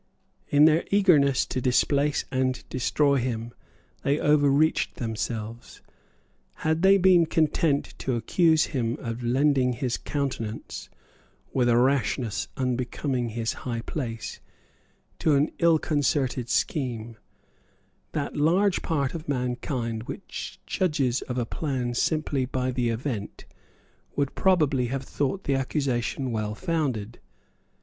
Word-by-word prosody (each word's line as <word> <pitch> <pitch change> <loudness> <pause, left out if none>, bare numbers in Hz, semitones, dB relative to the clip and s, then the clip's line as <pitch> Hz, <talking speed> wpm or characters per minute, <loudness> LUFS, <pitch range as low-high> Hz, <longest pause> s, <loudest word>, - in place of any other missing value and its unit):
In 145 +1 +5
their 160 +1 +4
eagerness 155 -10 +4
to 130 - -3
displace 140 +3 +2
and 130 -1 -1
destroy 140 +2 +2
him 120 -2 -3 0.5
they 140 +1 +1
overreached 150 +1 +3
themselves. 115 0 -5 0.8
Had 160 +1 +2
they 195 +1 +6
been 180 -3 +5
content 155 -2 +1
to 130 - -1
accuse 160 +6 +3
him 120 -1 -1
of 115 -1 -5
lending 130 +1 +2
his 120 0 -2
countenance, 130 -7 -4 0.6
with 125 -2 +2
a 120 - +4
rashness 120 -3 +1
unbecoming 125 0 -1
his 115 0 -2
high 120 -2 -3
place, 115 -3 -5 0.8
to 155 - +3
an 145 +3 +2
illconcerted 145 -6 +1
scheme, 120 -6 -1 1.0
that 145 -2 -3
large 180 +6 +2
part 140 -5 -1
of 160 -2 -7
mankind 125 -3 -2
which - - -7
judges 140 -8 0
of 125 - -2
a 120 - 0
plan 125 -2 -2
simply 145 0 0
by 130 0 -1
the 125 -1 0
event 115 -3 -4 0.7
would 140 -1 0
probably 150 -9 +2
have 135 +2 -3
thought 145 +8 -2
the 140 - 0
accusation 135 -1 -1
well 105 -1 -2
founded. 135 - -2
130 Hz, 120 wpm, -26 LUFS, 120-150 Hz, 1.0 s, they